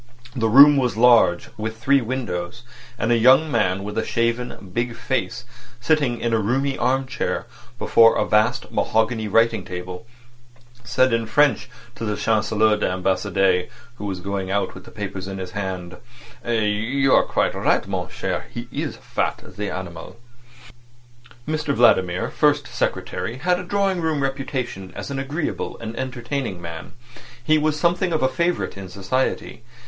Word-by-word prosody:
The 115 -3 +1
room 140 +5 +8
was 125 -5 0
large, 115 -7 +5
with 110 +1 -4
three 135 +4 +3
windows; 115 -7 -4 0.3
and 115 - 0
a 120 - +4
young 135 +6 +5
man 100 -5 +1
with 105 +2 -3
a - - 0
shaven, 115 -4 -2
big 120 +1 -1
face, 120 -1 -3 0.3
sitting 130 -2 +1
in 120 -1 -1
a 115 - +3
roomy 135 +6 0
arm 130 +2 +1
chair 130 - -3 0.3
before 115 -1 +5
a - - +1
vast 110 +4 +1
mahogany 110 0 0
writing 115 -1 +2
table, 90 +4 -7 0.8
said 130 +1 +2
in 115 -1 0
French 145 -1 +2 0.2
to 115 - -8
the 105 -1 -1
Chancelier 110 -1 +2
d'Ambassade, 95 -1 +1 0.3
who 105 - -6
was 95 -2 -4
going 100 0 -3
out 100 +1 -1
with - - -12
the - - -12
papers 100 -3 -6
in 95 0 -5
his 95 -1 -6
hand: 95 -3 -5 0.5
"You 115 +4 +1
are - - +7
quite - - 0
right, - - +1
mon - - -3
cher. - - -4
He's 120 0 -5
fat—the 105 0 -4
animal." 85 -3 -7 1.3
Mr 150 -2 -1
Vladimir, 95 -6 +3
First 145 -1 +2
Secretary, 105 -4 -3
had 180 +5 +1
a - - -5
drawing 195 -1 0
room 155 -3 0
reputation 130 -7 -3
as - - -6
an 135 - -3
agreeable 145 +4 -3
and 115 0 -7
entertaining 130 -5 -4
man. 85 -2 -8 0.5
He 155 +4 +3
was 155 0 0
something 175 +3 +1
of 155 -4 0
a - - +5
favourite 175 +2 -1
in 95 -1 -8
society. 100 +5 -2
115 Hz, 155 wpm, -22 LUFS, 100-135 Hz, 1.3 s, room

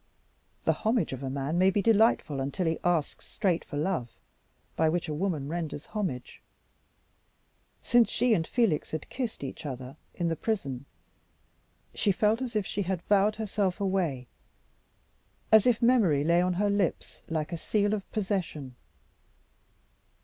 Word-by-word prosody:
The - - +3
homage 220 - 0
of 130 - -6
a 135 - -3
man 140 +5 -1
may 185 +1 +5
be 200 +1 +1
delightful 220 - +3
until 140 +7 -2
he 160 0 0
asks 170 -4 0
straight 180 -4 0
for 145 - -7
love, 150 -6 -1 0.7
by 160 - +3
which 175 +2 -1
a 155 - -3
woman 155 -4 -1
renders 160 -2 -4
homage. 180 - -4 1.4
Since 240 -1 +4
she 245 0 +2
and 165 -6 +1
Felix 220 -11 +1
had 155 -1 -5
kissed 245 - -4
each 135 +4 -6
other 130 -2 -6 0.2
in 175 - -1
the 165 - 0
prison, 140 - -3 1.1
she 205 - +2
felt 215 +5 +2
as 245 -3 -4
if 210 -2 +1
she 205 - -2
had 185 -2 -2
vowed 205 +1 +3
herself 205 -3 -1
away, 180 -10 0 1.3
as 220 +1 +7
if 240 -2 +2
memory 210 - +4
lay 170 +3 +4
on 180 0 +1
her 205 +3 +1
lips 200 -4 -1
like 160 0 -2
a - - -2
seal 205 +4 +1
of 205 -2 -4
possession. 185 - -3
180 Hz, 155 wpm, -28 LUFS, 150-210 Hz, 1.4 s, as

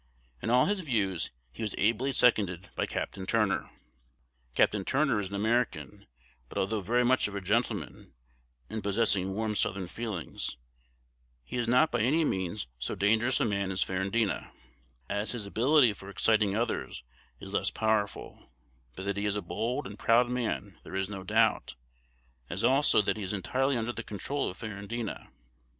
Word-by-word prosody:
In - - -2
all 125 +2 +5
his 205 0 0
views 105 - 0 0.2
he - - -10
was 105 -3 -2
ably 115 +6 +2
seconded 100 -8 +2
by - - 0
Capt. - - -4
Turner. 105 -3 +1 0.9
"Capt. - - +4
Turner 135 -5 +2
is 100 -2 -3
an 100 - -5
American; 105 -1 -1 0.4
but - - -7
although 105 +2 0
very 120 +6 +2
much 130 -1 +3
of 100 - -7
a - - -1
gentleman, 105 +6 -1 0.6
and 110 +1 -4
possessing 100 -2 +1
warm 110 0 -1
Southern 95 -2 0
feelings, 100 - -4 0.9
he - - -7
is 120 -2 0
not 125 +7 +4
by 120 - +1
any 150 +8 +3
means 95 - -2
so 60 - -3
dangerous 115 +6 +2
a - - +2
man 100 -3 0
as 95 0 +1
Ferrandina, 95 +3 -1 0.6
as 105 +3 -1
his 115 -4 -4
ability 125 +3 +4
for 95 0 -11
exciting 105 0 +2
others 115 - -2 0.4
is - - -9
less - - +1
powerful; 110 -2 -1 0.5
but 95 - -6
that 100 0 -1
he 100 +1 0
is 105 - 0
a 105 - -1
bold 110 +9 -2
and 100 +2 -8
proud 120 +2 +4
man 110 -6 -2
there - - -8
is 95 0 -1
no 100 -2 -5
doubt, 95 - +2 0.7
as - - -3
also 130 -3 +5
that 100 - 0
he 105 - -4
is 95 - -3
entirely 130 +7 0
under 115 +1 -2
the 115 - -4
control 135 +7 -3
of 90 - -9
Ferrandina. 110 +1 -5
110 Hz, 170 wpm, -30 LUFS, 100-120 Hz, 0.9 s, all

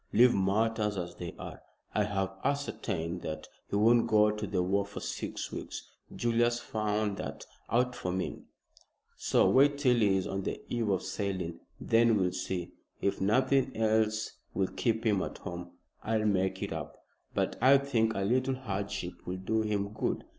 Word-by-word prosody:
"Leave 120 +3 +6
matters 105 +2 +1
as 85 -1 -4
they 85 -2 -5
are. - - -8 0.3
I 105 - +2
have 95 -2 -1
ascertained 90 - -2
that 80 0 -5 0.2
he - - -2
won't 115 +3 +5
go 105 0 +5
to 105 0 -4
the 90 -3 0
war 100 +2 +2
for 100 +1 -8
six - - -4
weeks. - - -7 0.2
Julius 120 0 +2
found 105 -2 -1
that - - -6 0.2
out 125 +2 +2
for 90 - -3
me, 95 +1 -2 0.8
so - - +3
wait 140 +2 +5
till 130 -4 +3
he 100 -4 +4
is 95 - -1
on 95 0 -2
the - - -3
eve 115 -3 0
of 95 -2 +1
sailing. 95 -5 -3 0.2
Then 115 -1 +4
we'll 90 -2 +2
see. 90 -1 -3 0.3
If 100 - 0
nothing 130 +5 +2
else 110 0 +2 0.2
will 95 -1 +1
keep 115 -1 -1
him 105 -4 +3
at - - -4
home, 90 0 -6 0.3
I'll 110 -1 0
make 95 -2 +1
it - - -3
up. - - -6 0.4
But - - 0
I 135 +2 +8
think 115 -5 +1
a 100 - -1
little 130 +6 +1
hardship 100 -6 -4
will 90 +1 -2
do 110 +4 0
him 105 -2 -1
good. - - -1
105 Hz, 175 wpm, -31 LUFS, 95-115 Hz, 0.8 s, I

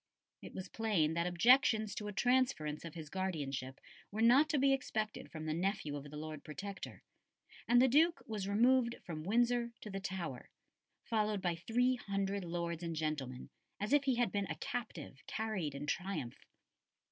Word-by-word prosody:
It - - -10
was 185 0 -5
plain 195 -10 +1
that 170 +1 0
objections 220 +3 +4
to 210 - -5
a - - -3
transference 205 -10 +1
of 165 -1 -8
his 160 -2 -7
guardianship 140 -9 -3 0.3
were 220 +2 -1
not 265 +6 +6
to 300 - +2
be 275 0 +4
expected 215 -5 -2
from 155 -1 -6
the 155 - -1
nephew 170 -4 -1
of 145 0 -7
the 150 - -8
Lord 155 -1 -6
Protector, 190 +5 -7 0.6
and 240 +1 +6
the 260 - +6
Duke 320 +6 +4
was 210 -4 -4
removed 235 +3 +4
from 160 -3 -5
Windsor 235 +5 +2
to 210 - -7
the 195 - -3
Tower, 180 -9 -5 0.5
followed 215 -2 0
by 180 -2 0
three 245 +9 +1
hundred 200 -2 -2
lords 170 -1 -3
and 165 -1 -3
gentlemen, 150 -5 -3 0.3
"as 210 +6 -1
if 290 -1 +4
he 265 -2 +3
had 240 -4 +1
been 200 -1 -1
a - - -3
captive 200 - -5
carried 195 -10 -2
in 140 +1 -4
triumph." 175 -7 -3
195 Hz, 175 wpm, -35 LUFS, 160-235 Hz, 0.6 s, not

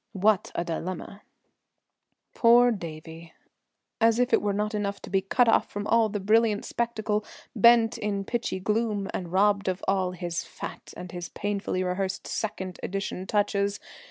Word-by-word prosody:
What 205 +1 +2
a 170 - 0
dilemma! 180 +4 -5 1.1
Poor 240 +1 +6
Davie! 165 -3 -8 0.7
As 225 -1 +4
if 250 +1 +1
it - - +5
was 205 -1 0
not 210 +1 -1
enough 200 -1 -2
to - - -9
be 195 -1 +2
cut 240 +6 +2
off 225 - +3
from 205 0 -5
all 225 0 +3
the 205 0 -3
brilliant 215 +1 +2
spectacle, 220 -3 -1 0.4
pent 235 0 +6
in 200 -1 -2
pitchy 235 -4 -2
gloom 210 0 -1
and 175 -3 -4
robbed 200 +1 +2
of 185 0 -2
all 190 -2 +1
his 175 -1 -3
"fat" - - -9
and 180 -1 -8
his 175 -1 -6
painfully 200 -2 -2
rehearsed 190 +1 -2
"second 190 -4 -4
edition" 195 -1 -4
touches. 200 -1 0
200 Hz, 155 wpm, -27 LUFS, 185-220 Hz, 1.1 s, Poor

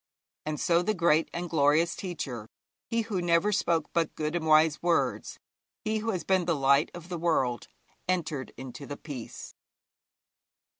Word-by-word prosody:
And 155 -1 -2
so 170 -1 +3
'the 215 +4 0
great 165 -2 +3
and 175 +1 -4
glorious 160 +1 +3
teacher,' 135 - -5 0.4
he 230 0 0
who 215 -5 -2
never 175 +4 +3
spoke 170 -6 +1
but 165 -2 0
good 155 +2 -2
and 160 -2 -1
wise 155 0 +5
words, 170 -1 0 0.5
he 220 0 0
who 225 +2 -3
has 185 -7 -1
been 185 +1 +2
the 170 -1 +1
light 140 +2 +3
of 175 -1 -9
the 175 -2 -4
world, 130 - 0 0.4
entered 155 -7 -1
into 130 +2 -8
the 145 - -6
Peace. 135 -7 -8
165 Hz, 160 wpm, -28 LUFS, 150-175 Hz, 0.5 s, wise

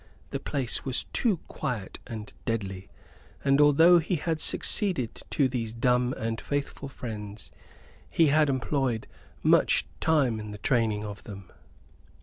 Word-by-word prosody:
The - - -2
place 130 -4 -1
was 130 -1 0
too 225 -8 +2
quiet 120 -10 -4
and 110 -3 -7
deadly; 95 -5 -3 0.6
and 140 +1 +4
although 160 +4 +7
he 170 +3 -1
had 160 0 -2
succeeded 175 - +2
to 140 - +2
these 115 -3 -3
dumb 125 +1 +1
and 115 0 -3
faithful 140 -1 -3
friends, 105 -5 -7 0.6
he 165 - +4
had 150 0 +4
employed 130 -3 0 0.4
much - - +4
time 140 -9 +2
in 105 0 -7
the 105 - -7
training 110 -2 +1
of 105 -1 -7
them. 100 -4 -10
125 Hz, 135 wpm, -27 LUFS, 110-145 Hz, 0.6 s, although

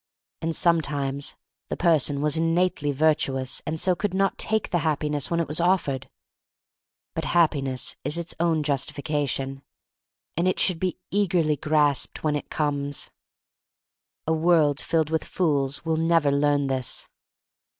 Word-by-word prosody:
And 165 0 -1
sometimes 145 -4 +1 0.3
the - - -3
person 155 -5 +2
was 150 +1 +1
innately 165 -2 +1
virtuous 135 -3 +1
and 160 +1 -2
so 180 +2 +3
could 190 +1 -2
not 195 0 +1
take 220 -1 -1
the 175 - +2
Hap 155 -2 0
piness 150 -2 -1
when 170 - 0
it 165 - 0
was 155 +3 0
offered. 170 -7 0 1.0
But - - -3
Hap 170 -2 +5
piness 135 -4 -2
is 155 - -1
its 170 0 -2
own 165 -2 +1
justification, 140 -1 -2 0.7
and 170 +3 +1
it 185 - +1
should 180 -4 +3
be 185 0 -1
eagerly 175 -6 +2
grasped 145 -1 +1
when 150 -1 +1
it 145 - -5
comes. 145 -2 -2 1.1
A 160 - +1
world 160 -3 +3
filled 160 -2 0
with 160 - 0
fools 145 -5 -1
will 160 -1 0
never 165 -3 +3
learn 145 0 +2
this. 130 -2 -2
155 Hz, 150 wpm, -25 LUFS, 140-170 Hz, 1.1 s, Hap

